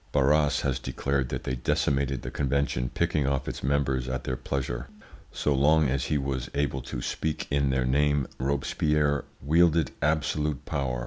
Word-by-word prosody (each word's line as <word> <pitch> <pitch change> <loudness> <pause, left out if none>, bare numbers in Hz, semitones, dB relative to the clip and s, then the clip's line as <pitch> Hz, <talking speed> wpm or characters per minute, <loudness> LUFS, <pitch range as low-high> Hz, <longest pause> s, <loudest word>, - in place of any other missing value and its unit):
Barras 75 +1 +3
has 65 -2 0
declared 70 -1 -1
that - - -4
they 65 - -2
decimated 70 +1 0
the - - -5
convention, 70 -3 0
picking 75 0 0
off 70 -1 -1
its - - -4
members 65 -2 0
at 65 0 -3
their 65 - -2
pleasure. 65 -1 -3 0.4
So 75 - 0
long 75 +2 +4
as 65 0 0
he 75 - +1
was 70 -2 -2
able 70 -2 0
to - - -6
speak 80 -1 -2
in 70 -1 +2
their 65 -1 +1
name, 70 +1 +2
Robespierre 70 +2 +1 0.2
wielded 80 0 +3
absolute 75 -2 0
power. 65 -3 -2
70 Hz, 165 wpm, -27 LUFS, 65-75 Hz, 0.4 s, long